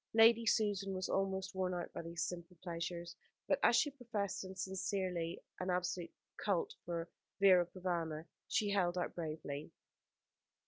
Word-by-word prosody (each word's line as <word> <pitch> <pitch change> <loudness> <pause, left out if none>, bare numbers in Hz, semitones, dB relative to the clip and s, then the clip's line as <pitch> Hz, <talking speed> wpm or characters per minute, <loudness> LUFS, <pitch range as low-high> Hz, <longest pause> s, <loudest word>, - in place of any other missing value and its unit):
Lady 230 0 +7
Susan 200 -3 +2
was 185 0 -2
almost 190 0 0
worn 185 -1 0
out 175 - -4
by - - -4
these 165 0 -3
simple 175 0 -7
pleasures; 170 0 -4 0.3
but - - +3
as - - +6
she 290 - +4
professed, 220 -8 -2
and 190 0 -8
sincerely, 185 -2 -1 0.2
an 185 - -2
absolute 180 -1 0 0.3
culte 195 -5 +1
for 170 -1 -2 0.3
Vera 185 -3 +7
Provana, 170 -3 -2 0.2
she 210 -1 +2
held 180 -3 +2
out 180 - -1
bravely. 155 -3 -4
185 Hz, 145 wpm, -37 LUFS, 170-195 Hz, 0.3 s, Lady